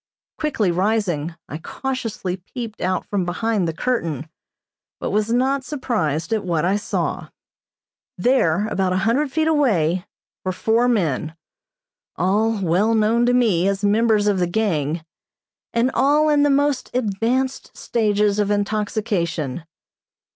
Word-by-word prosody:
Quickly 230 Hz, -, +1 dB
rising, 175 Hz, -4 st, 0 dB
I 150 Hz, -, -6 dB
cautiously 225 Hz, -4 st, -4 dB
peeped 220 Hz, +4 st, -8 dB
out 185 Hz, +1 st, -1 dB
from 200 Hz, -3 st, -1 dB
behind 190 Hz, +2 st, 0 dB
the -, -, 0 dB
curtain, 165 Hz, -, -2 dB, 0.7 s
but -, -, -3 dB
was 215 Hz, +2 st, 0 dB
not 265 Hz, +3 st, +1 dB
surprised 220 Hz, -, -2 dB
at 220 Hz, -, 0 dB
what 170 Hz, -3 st, 0 dB
I 190 Hz, +3 st, +2 dB
saw. 205 Hz, -, -2 dB, 0.9 s
There, 210 Hz, -6 st, +2 dB
about 190 Hz, -3 st, 0 dB
a -, -, +1 dB
hundred 270 Hz, +5 st, +1 dB
feet 315 Hz, +1 st, +1 dB
away, 185 Hz, -, +2 dB, 0.4 s
were 185 Hz, -, -1 dB
four 225 Hz, +5 st, +2 dB
men, 160 Hz, -, 0 dB, 0.8 s
all 210 Hz, +5 st, +1 dB
well 190 Hz, +7 st, +2 dB
known 225 Hz, +2 st, +3 dB
to 245 Hz, -, +3 dB
me 200 Hz, -8 st, +3 dB
as 200 Hz, 0 st, -1 dB
members 215 Hz, 0 st, +3 dB
of 205 Hz, -2 st, +2 dB
the 175 Hz, -, +1 dB
gang, 170 Hz, -6 st, -1 dB, 0.7 s
and 235 Hz, +3 st, +1 dB
all 295 Hz, +3 st, +3 dB
in 295 Hz, -1 st, +4 dB
the 290 Hz, -, +4 dB
most 285 Hz, -1 st, +1 dB
advanced 250 Hz, +4 st, -1 dB
stages 210 Hz, -2 st, +1 dB
of 205 Hz, -1 st, +1 dB
intoxication. 200 Hz, -, -1 dB
210 Hz, 135 wpm, -21 LUFS, 180-240 Hz, 0.9 s, in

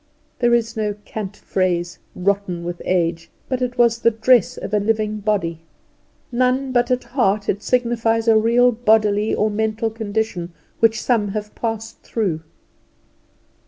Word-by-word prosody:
There 240 Hz, -1 st, +4 dB
is 230 Hz, -1 st, -1 dB
no 210 Hz, -2 st, -1 dB
cant 205 Hz, -2 st, -6 dB
phrase, 175 Hz, -2 st, -1 dB, 0.2 s
rotten 185 Hz, -2 st, -1 dB
with 175 Hz, 0 st, -5 dB
age, 165 Hz, -2 st, 0 dB, 0.2 s
but 255 Hz, -1 st, -2 dB
it 250 Hz, -1 st, -2 dB
was 235 Hz, -1 st, +3 dB
the 230 Hz, -, +4 dB
dress 230 Hz, -1 st, +3 dB
of -, -, -6 dB
a 210 Hz, -, +4 dB
living 215 Hz, 0 st, 0 dB
body; 195 Hz, -6 st, -1 dB, 0.7 s
none 255 Hz, +2 st, +1 dB
but 245 Hz, 0 st, +2 dB
at 250 Hz, 0 st, +1 dB
heart 215 Hz, -5 st, 0 dB
it 200 Hz, -, -1 dB
signifies 230 Hz, -2 st, +1 dB
a 225 Hz, -, +6 dB
real 235 Hz, +3 st, +4 dB
bodily 215 Hz, -2 st, +2 dB
or 215 Hz, 0 st, +1 dB
mental 220 Hz, +1 st, -1 dB
condition 210 Hz, -5 st, -3 dB, 0.3 s
which 225 Hz, 0 st, +3 dB
some 225 Hz, -4 st, +1 dB
have 210 Hz, -1 st, -5 dB
passed 225 Hz, -1 st, -4 dB
through. 190 Hz, -9 st, -2 dB
220 Hz, 150 wpm, -21 LUFS, 200-235 Hz, 0.7 s, a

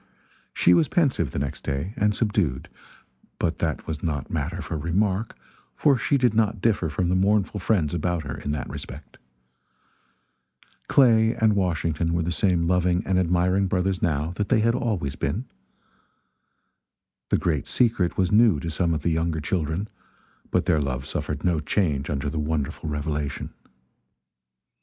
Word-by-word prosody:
She 90 Hz, -, +4 dB
was 155 Hz, -, +4 dB
pensive, 135 Hz, -, +1 dB
the -, -, -6 dB
next 70 Hz, -1 st, -3 dB
day, 70 Hz, +9 st, -3 dB
and 105 Hz, 0 st, +1 dB
subdued; 100 Hz, -, -1 dB, 0.7 s
but 85 Hz, -1 st, -1 dB
that 80 Hz, -3 st, -2 dB
was 80 Hz, -1 st, -5 dB
not 75 Hz, -5 st, -3 dB
matter -, -, -2 dB
for -, -, -5 dB
remark, 95 Hz, +7 st, -1 dB, 0.4 s
for 145 Hz, -2 st, +4 dB
she 130 Hz, +3 st, +1 dB
did 125 Hz, -4 st, +2 dB
not 110 Hz, -1 st, +1 dB
differ 100 Hz, -5 st, +1 dB
from 85 Hz, +4 st, -1 dB
the 90 Hz, -, +1 dB
mournful 100 Hz, +2 st, +1 dB
friends 90 Hz, -6 st, +1 dB
about 85 Hz, 0 st, -1 dB
her 75 Hz, -, -5 dB
in -, -, -6 dB
that 75 Hz, -1 st, -2 dB
respect. 70 Hz, +1 st, -9 dB, 1.7 s
Clay 115 Hz, -4 st, +4 dB
and 110 Hz, -1 st, +3 dB
Washington 85 Hz, -3 st, 0 dB
were 85 Hz, -, +1 dB
the 85 Hz, -, -2 dB
same 90 Hz, -1 st, +1 dB
loving 90 Hz, 0 st, +1 dB
and 95 Hz, -1 st, +2 dB
admiring 90 Hz, +2 st, +2 dB
brothers 90 Hz, 0 st, 0 dB
now 80 Hz, -1 st, 0 dB
that 105 Hz, -, -2 dB
they 115 Hz, -4 st, +3 dB
had 115 Hz, +1 st, +3 dB
always 105 Hz, -, -2 dB
been. 90 Hz, -, -2 dB, 1.8 s
The -, -, +3 dB
great 80 Hz, -5 st, -1 dB
secret 110 Hz, -8 st, +1 dB
was 95 Hz, -2 st, +1 dB
new 105 Hz, -6 st, +5 dB
to 85 Hz, -, -4 dB
some 85 Hz, +1 st, 0 dB
of 75 Hz, -, -4 dB
the 85 Hz, -, +1 dB
younger 80 Hz, 0 st, 0 dB
children, 80 Hz, +4 st, -2 dB, 0.6 s
but -, -, +1 dB
their 75 Hz, -, +2 dB
love 65 Hz, -2 st, -3 dB
suffered 75 Hz, 0 st, -4 dB
no 90 Hz, -3 st, +2 dB
change 75 Hz, -3 st, 0 dB
under 70 Hz, -1 st, -2 dB
the 75 Hz, +2 st, -2 dB
wonderful 75 Hz, 0 st, -2 dB
revelation. 75 Hz, -1 st, -3 dB
85 Hz, 160 wpm, -24 LUFS, 75-100 Hz, 1.8 s, new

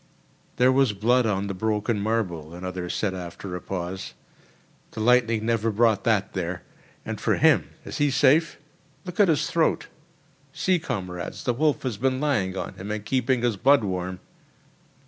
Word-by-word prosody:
"There 125 Hz, +2 st, +4 dB
was 130 Hz, -4 st, +3 dB
blood 120 Hz, +4 st, +2 dB
on 100 Hz, -2 st, 0 dB
the 100 Hz, -, -3 dB
broken 105 Hz, +2 st, -1 dB
marble," 90 Hz, -7 st, -2 dB
another 90 Hz, 0 st, -5 dB
said 100 Hz, 0 st, -1 dB
after 90 Hz, +1 st, -7 dB
a 90 Hz, -, -5 dB
pause—"the 95 Hz, +4 st, -9 dB
lightning 115 Hz, -1 st, +3 dB
never 115 Hz, -1 st, +1 dB
brought 110 Hz, -1 st, +2 dB
that 105 Hz, -4 st, +1 dB
there. 90 Hz, -2 st, -3 dB, 0.4 s
And -, -, -5 dB
for -, -, +2 dB
him—is -, -, +1 dB
he 145 Hz, 0 st, +3 dB
safe? 145 Hz, +4 st, +3 dB, 0.5 s
Look 180 Hz, +1 st, -8 dB
at 205 Hz, -, +6 dB
his 160 Hz, -4 st, +2 dB
throat! 165 Hz, -1 st, 0 dB, 0.6 s
See, 185 Hz, -2 st, +1 dB
comrades, 95 Hz, -, -5 dB
the 125 Hz, -, +1 dB
wolf 150 Hz, +4 st, +1 dB
has 125 Hz, -6 st, -2 dB
been 130 Hz, +3 st, 0 dB
lying 105 Hz, -11 st, 0 dB
on -, -, -4 dB
him 95 Hz, +3 st, -8 dB
and 105 Hz, -1 st, -4 dB
keeping 130 Hz, +1 st, +1 dB
his 120 Hz, -4 st, +1 dB
blood 135 Hz, +3 st, +4 dB
warm." 90 Hz, -1 st, -3 dB
110 Hz, 160 wpm, -25 LUFS, 95-130 Hz, 0.6 s, at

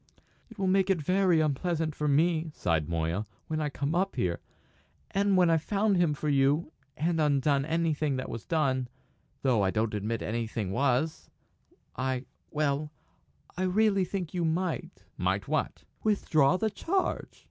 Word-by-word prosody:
"It -, -, -14 dB
will 195 Hz, -, -1 dB
make 190 Hz, +1 st, +3 dB
it 190 Hz, -3 st, +3 dB
very 180 Hz, +1 st, +3 dB
unpleasant 155 Hz, +2 st, 0 dB
for 150 Hz, 0 st, -2 dB
me," 160 Hz, +3 st, +2 dB
sighed 80 Hz, -2 st, 0 dB
Moya, 85 Hz, +5 st, -1 dB, 0.2 s
"when 155 Hz, 0 st, -2 dB
I 150 Hz, -, 0 dB
come 140 Hz, +2 st, -2 dB
up 190 Hz, +3 st, 0 dB
here. 85 Hz, -2 st, -1 dB, 0.7 s
And 200 Hz, -1 st, +2 dB
when 175 Hz, -2 st, +5 dB
I've 165 Hz, -1 st, +3 dB
found 205 Hz, +3 st, +1 dB
him 170 Hz, -4 st, +2 dB
for 150 Hz, -, -4 dB
you 145 Hz, +3 st, +2 dB, 0.3 s
and 165 Hz, +1 st, +1 dB
undone 140 Hz, -1 st, +2 dB
anything 155 Hz, -3 st, 0 dB
that 130 Hz, -, -3 dB
was 115 Hz, -, -6 dB
done 135 Hz, -6 st, 0 dB, 0.6 s
though 125 Hz, -6 st, +3 dB
I 95 Hz, -, +2 dB
don't 110 Hz, +2 st, 0 dB
admit 105 Hz, +2 st, -2 dB
that -, -, -4 dB
anything 110 Hz, -3 st, -2 dB
was 140 Hz, +6 st, 0 dB, 0.7 s
I 130 Hz, 0 st, -2 dB, 0.2 s
well, 150 Hz, 0 st, -1 dB, 0.6 s
I 180 Hz, -, -4 dB
really 195 Hz, +1 st, +3 dB
think 180 Hz, -2 st, -4 dB
you 175 Hz, -2 st, -1 dB
might!" 170 Hz, +3 st, -2 dB, 0.2 s
"Might -, -, 0 dB
what?" -, -, -1 dB, 0.2 s
"Withdraw 175 Hz, -7 st, +3 dB
the 220 Hz, +2 st, 0 dB
charge!" 370 Hz, -, -2 dB
155 Hz, 160 wpm, -29 LUFS, 130-180 Hz, 0.7 s, when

